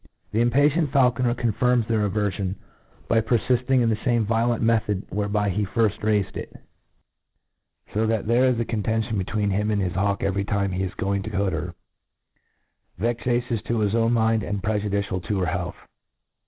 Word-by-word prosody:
The 110 +3 +1
impatient 145 +5 +3
faulconcr 125 -3 +2
confirms 120 0 +1
their 110 -3 +1
averfion, 100 -2 -1 0.5
by 115 - +3
perfifting 125 +3 +2
in 115 - +2
the 110 - +1
lame 120 -3 +2
violent 115 +2 +1
method 110 -3 +1
whereby 105 0 0
he 105 +3 0
firft 110 +1 0
raifcd 105 -2 0
it; - - -7 1.4
fo 110 +2 +1
that 110 -2 0
there 120 +3 +3
is 125 -2 +2
a 115 - 0
contention 110 0 -1
between 100 +2 -1
him 105 +2 0
and 105 -1 +1
his 95 -2 -1
hawk 100 +1 0
^very 100 0 0
tiipe 100 -1 -1
he 90 - -2
is 95 -1 -3
going 100 0 -1
to 105 - -5
hood 100 -2 +1
her, 85 +2 -4 1.2
vexa 120 +2 0
tious 120 -3 -3
to 115 - -1
his 105 -2 +1
own 115 0 +2
iliin4, 110 -2 +1
and 100 0 -3
prejudicial 100 -3 -1
to 95 +4 -2
her 90 - +1
health. 90 +1 -3
110 Hz, 175 wpm, -24 LUFS, 100-115 Hz, 1.4 s, impatient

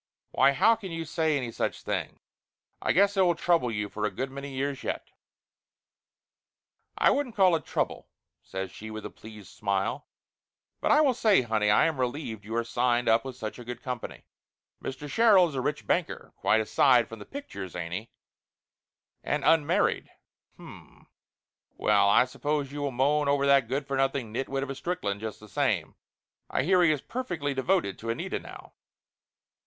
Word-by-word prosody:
Why 140 - +4
how 225 - +5
can 200 -4 -8
you 165 0 -4
say 155 -1 0
any 125 -4 -3
such - - -3
thing? - - -3 0.6
I - - +1
guess 200 +2 +3
I - - +5
will 175 -2 +4
trouble 170 -6 +2
you 105 -2 -2
for 105 +1 -6
a 105 - +2
good 130 +7 -4
many 140 +1 -7
years 135 +1 -3
yet - - -4 0.8
!" - - -56
"I - - +5
wouldn't 270 -4 -1
call 185 -4 +5
it 160 - -4
trouble," - - -2 0.3
says 95 -1 -6
she 110 - -9
with 110 -1 -7
a - - -6
pleased 105 -3 -12
smile. 100 -1 -1 0.7
"But - - -1
I 300 - +6
will 280 -4 +4
say, 215 - +3
honey, 110 -3 +1
I 105 - +5
am 160 -4 -1
relieved 125 -4 -3
you 110 +2 -5
are 115 - +1
signed 120 +1 0
up 115 0 +4
with 130 -2 -7
such 110 -1 -6
a - - -8
good 120 +1 -8
company. 125 -3 -6 0.6
Mr. 135 +2 -5
Sherrill 200 +1 +5
is 155 - -8
a 130 - -2
rich 145 +3 -2
banker, 175 -2 -2
quite 110 - +2
aside 120 +2 +4
from 115 - -10
the - - -8
pictures, 100 - -8
ain't 85 -1 -4
he? 110 +6 -5 1.1
And - - -1
unmarried. 165 +5 +2 0.5
H'm! - - -14 0.7
Well, 100 - +3
I 110 - +5
suppose 145 +2 -2
you 145 0 -5
will 145 - 0
moan 140 +3 +1
over 140 0 +2
that 140 -3 +4
good 135 +4 -2
for 140 0 -3
nothing 135 -4 0
nitwit 135 +2 -2
of 140 - -4
a - - -2
Strickland, 130 - -3
just 110 -1 -5
the 105 - -13
same. 100 - 0 0.6
I - - 0
hear 180 +4 +4
he 170 -3 +5
is 150 -3 -1
perfectly 175 - -3
devoted 135 - 0
to 115 - -6
Anita 115 - -2
now." - - -12
135 Hz, 185 wpm, -28 LUFS, 115-160 Hz, 1.1 s, I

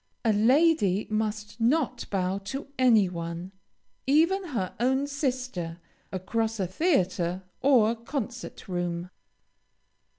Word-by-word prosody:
A 220 - +4
lady 220 - +3
must 215 +1 -2
not 250 0 +1
bow 190 0 0
to 270 +8 -5
any 225 -6 +5
one, 170 +1 -5 0.6
even 335 +7 +3
her 230 - -3
own 265 +3 +2
sister, 255 - -3 0.3
across 220 +4 -2
a 190 - +1
theatre 185 - 0 0.2
or 240 -4 +4
concert 235 0 -6
room. 175 -1 -3
220 Hz, 105 wpm, -27 LUFS, 185-265 Hz, 0.6 s, any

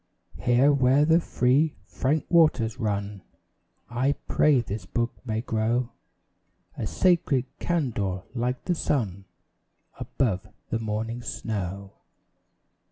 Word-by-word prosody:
Here 120 +7 +4
where 135 +2 +4
the 160 +2 +5
free, 145 0 +2
frank 145 +4 -1
waters 130 -9 +3
run, 100 -3 -2 0.7
I 125 +4 +1
pray 145 -4 +4
this 105 -3 -5
book 120 +2 -1 0.2
may 110 0 -1
grow 115 +2 0 0.8
A 110 - -3
sacred 170 - +2
candour 110 - -1
like 125 +1 -2
the 180 - +1
sun 105 - -1 0.7
Above 105 -7 -1 0.2
the 115 - 0
morning 115 +2 -3
snow. 100 -4 -4
120 Hz, 105 wpm, -26 LUFS, 105-140 Hz, 0.8 s, the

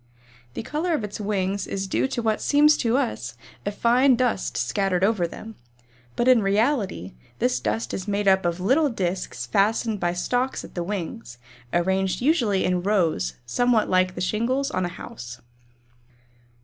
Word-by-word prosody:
The - - -4
color 320 +7 -1
of 235 - -3
its 210 0 -6
wings 200 -1 -1
is 195 0 -3
due 195 - 0
to 240 -3 -3
what 220 -1 0
seems 300 +1 +5
to 235 +2 +1
us 110 - -2 0.3
a - - +1
fine 245 +5 +4
dust 240 -5 -1
scattered 195 -3 0
over 195 -4 +2
them, 220 +6 -9 0.6
but 240 - 0
in 255 -3 +6
reality 200 - 0 0.2
this 125 0 +1
dust 110 0 -2
is 190 - -4
made 205 0 -1
up 190 0 +4
of 170 0 -1
little 270 - +3
discs 185 - -3
fastened 210 - +1
by 175 -1 0
stalks 245 +9 -1
to - - -10
the 175 - -5
wings, 180 - -5 0.3
arranged 190 +2 +1
usually 240 - +2
in 180 -1 +1
rows 175 - 0
somewhat 235 - +1
like 185 0 +2
the 180 - -5
shingles 250 +9 0
on 185 - -1
a - - -2
house. 120 - -9
200 Hz, 165 wpm, -24 LUFS, 180-235 Hz, 0.6 s, in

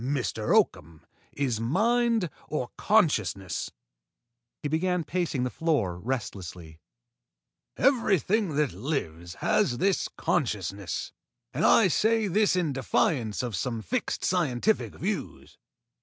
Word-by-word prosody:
Life, 130 -4 -1
Mr. - - 0
Oakham, 80 -1 0 0.3
is 130 -6 -1
mind 220 - +1 0.2
or 125 -5 -3
consciousness." 105 - +1 0.9
He - - 0
began 175 +3 0
pacing 160 -5 -1
the 125 - -1
floor 125 - 0
restlessly. 90 -9 -5 1.0
"Everything 215 - +2
that 150 -3 +1
lives 85 - -4
has 120 - +2
this 195 +5 +1
consciousness, - - -2 0.4
and - - -1
I 220 - +6
say 220 +4 +2
this 200 +1 +2
in 170 -6 0
defiance 120 -3 0
of 120 -4 -3
some 115 +1 -3
fixed 255 -3 -2
scientific 175 - +1
views. 200 +2 -5
145 Hz, 110 wpm, -27 LUFS, 115-185 Hz, 1.0 s, I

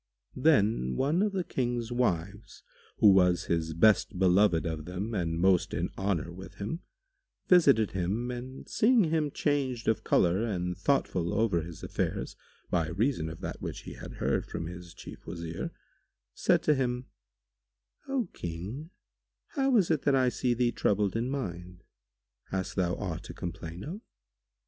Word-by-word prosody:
[FN#148] 130 - -7
Then 105 - +3
one 150 - +2
of 210 0 +2
the 190 -2 -1
King's 120 -5 -2
wives, 100 -4 -2 0.3
who 105 - +7
was 90 -2 +4
his 80 -1 -1
best 105 +1 +4
beloved 90 -1 +4
of 80 -2 -3
them 95 +6 -4
and 85 -5 -1
most 95 0 +3
in - - -2
honour 95 -4 -1
with 95 +2 -10
him, 105 +12 -4 0.7
visited 140 - +5
him 100 +7 -1
and 125 +2 -7
seeing 230 0 +4
him 155 -2 +1
changed 135 -5 -1
of 110 - +1
colour 90 +5 +3
and 90 -5 -2
thoughtful 95 -5 0
over 105 -5 +2
his 80 0 -9
affairs, - - -2 0.4
by 85 -3 +1
reason 90 - 0
of 80 - -9
that - - -5
which - - -5
he - - -8
had - - -9
heard - - -1
from 85 - -4
his 90 0 -9
Chief - - -11
Wazir, 85 -1 -4 0.6
said - - +2
to 150 - +4
him, 125 -2 -1 1.0
"O 270 -6 0
King, 95 - -6 0.6
how 270 -4 +2
is 185 -5 +3
it 155 -4 +2
that 140 0 +3
I 130 -1 +4
see 125 0 0
thee 120 0 +2
troubled 105 -2 +1
in 115 +3 0
mind? 90 -9 -5 0.7
Hast 95 -1 -3
thou 90 -1 +1
aught 90 -4 -4
to - - -9
complain 85 +1 -6
of?" 190 +8 -6
105 Hz, 160 wpm, -29 LUFS, 90-130 Hz, 1.0 s, who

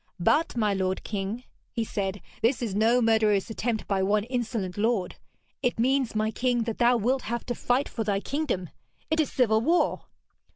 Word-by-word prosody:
'But, 295 - +2
my 210 -3 +2
lord 190 -1 -1
king,' 205 +4 -4 0.3
he 230 - -1
said, 200 -3 -3 0.2
'this 235 +1 +2
is 220 -5 -2
no 230 +4 +3
murderous 220 -2 +2
attempt 225 0 -2
by 195 -1 +1
one 205 +2 +2
insolent 230 -6 -3
lord. 210 -3 0 0.4
It 245 -2 0
means, 255 0 +1
my 215 0 +1
king, 245 0 0
that 225 -1 -4
thou 240 0 +5
wilt 250 +4 +1
have 235 +1 -4
to 245 - -2
fight 245 +3 0
for 225 - -3
thy 200 -2 0
kingdom. 240 - -2 0.4
It 315 - +2
is 310 - +1
civil 220 -4 +3
war!' 335 +8 +1
225 Hz, 180 wpm, -27 LUFS, 205-245 Hz, 0.4 s, thou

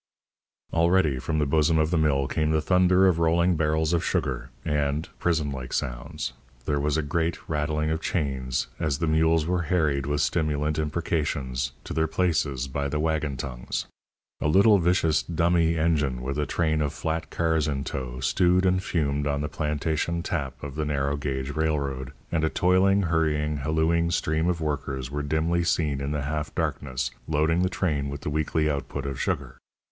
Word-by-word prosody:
Already 85 -4 +3
from 80 +5 -2
the 75 - +2
bosom 80 +3 +3
of 80 0 +2
the 85 - +2
mill 70 -3 +2
came 75 +1 0
the 80 0 +3
thunder 90 +3 +4
of 90 -3 +3
rolling 85 +2 +3
barrels 80 +1 +1
of 85 - +1
sugar, 65 - -1 0.2
and 75 0 0
(prison 80 -4 +1
like 65 -2 -6
sounds) 65 +2 -3 0.3
there 75 -1 0
was 75 +1 +1
a 80 - 0
great 80 +3 0
rattling 75 0 0
of 80 0 -1
chains 65 -5 -1
as 75 -4 0
the 80 - -1
mules 80 0 +3
were 90 +1 0
harried 75 -5 +1
with 75 0 0
stimulant 75 -1 0
imprecations 75 -5 -1
to - - -6
their 80 0 +1
places 75 -6 0
by 70 +1 -2
the 75 +2 -2
waggon 75 -3 0
tongues. 60 -2 -4 0.6
A - - +1
little 100 +6 +6
vicious 85 -3 +2
"dummy" 85 0 +2
engine, 75 -6 +1
with 70 +3 -2
a 75 - 0
train 80 0 +1
of 75 -1 -1
flat 80 +1 -3
cars 80 -2 +1
in 70 -2 -1
tow, 65 -2 -5
stewed 90 +6 +3
and 95 0 +3
fumed 75 -5 -1
on 70 0 0
the 75 - -1
plantation 80 +2 -1
tap 65 -7 -3
of 70 -2 -5
the 75 +2 -2
narrow 70 -1 0
gauge 70 -1 -3
railroad, 70 -4 -1 0.2
and 80 -2 0
a 80 - +3
toiling, 95 +3 +3
hurrying, 75 -3 +1
hallooing 80 +4 +1
stream 80 0 0
of 85 -2 -1
workers 70 -4 -3
were 75 +1 -2
dimly 80 +4 0
seen 80 -5 0
in 70 - -2
the 75 -1 -2
half 75 +2 -3
darkness 70 -5 -2 0.2
loading 80 +3 +2
the 90 - +2
train 75 -8 -1
with 70 0 -6
the - - -3
weekly 75 +1 0
output 70 -1 -3
of 70 -1 -3
sugar. - - -2
75 Hz, 180 wpm, -26 LUFS, 70-80 Hz, 0.6 s, little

